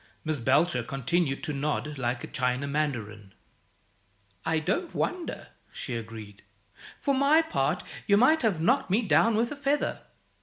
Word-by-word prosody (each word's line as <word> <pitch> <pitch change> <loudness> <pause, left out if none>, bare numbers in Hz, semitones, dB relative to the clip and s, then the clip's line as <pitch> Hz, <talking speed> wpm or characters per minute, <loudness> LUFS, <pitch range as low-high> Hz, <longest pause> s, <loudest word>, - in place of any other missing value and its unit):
Miss 155 -2 0
Belcher 130 +3 +2
continued 135 +4 -1
to 150 - -3
nod 150 0 -2
like 120 -1 -2
a - - -5
china 125 +2 -1
mandarin. 110 -9 -3 1.1
"I 160 0 +1
don't 340 - -2
wonder," 360 -2 -3 0.2
she 125 - -5
agreed. 110 -3 -8 0.6
"For 280 - +1
my 280 +4 +4
part, 320 - -1 0.2
you 200 -1 +5
might 285 +8 +5
have 215 -9 +1
knocked 240 - +2
me 210 +6 +2
down 225 +2 +4
with 230 +2 +1
a - - -4
feather. 285 +1 -1
155 Hz, 150 wpm, -28 LUFS, -, 1.1 s, you